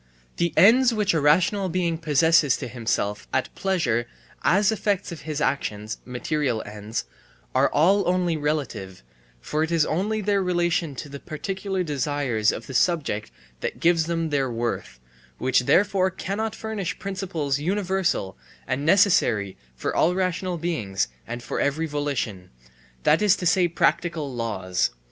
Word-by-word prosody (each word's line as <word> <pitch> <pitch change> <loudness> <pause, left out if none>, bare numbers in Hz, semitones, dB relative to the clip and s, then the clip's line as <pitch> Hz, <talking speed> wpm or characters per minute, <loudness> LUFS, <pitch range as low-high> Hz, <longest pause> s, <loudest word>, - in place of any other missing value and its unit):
The 170 -1 +1
ends 235 +9 +7
which 210 -3 +2
a 160 - +1
rational 180 +6 +3
being 170 -2 -1
proposes 155 -2 +3
to - - -5
himself 110 -3 -2
at 130 - -1
pleasure 130 -12 0 0.4
as 200 +3 +4
effects 205 -3 -1
of 165 -3 -7
his 150 -1 -2
actions 110 -7 -2
(material 125 -1 -1
ends) 105 +2 -5 0.5
are - - +3
all 190 +6 +3
only 180 -2 +1
relative, 135 - -3 0.4
for 150 - -2
it 160 - 0
is 165 -3 +3
only 205 +7 -1
their 205 -1 +1
relation 175 -4 0
to 145 - -6
the 140 0 -8
particular 190 +5 -3
desires 140 -7 0
of 115 - -6
the 135 - -8
subject 140 - +1 0.3
that - - -4
gives 165 -1 +3
them 165 -2 -1
their 135 -2 +1
worth, 115 - -3 0.4
which 130 -1 +2
therefore 190 -1 +3
cannot 200 +4 -3
furnish 220 -5 -4
principles 180 -8 -2
universal 185 - -1 0.3
and 130 +2 -2
necessary 155 - +3 0.2
for 60 - -3
all 175 +3 +3
rational 185 -1 -1
beings 115 - -2 0.2
and 120 +1 -6
for - - -3
every 150 +3 0
volition, 140 - -3 0.5
that - - +4
is 210 -2 +5
to 190 - -5
say 175 +1 +4
practical 165 -3 0
laws. 95 -6 -1
160 Hz, 150 wpm, -24 LUFS, 125-185 Hz, 0.5 s, ends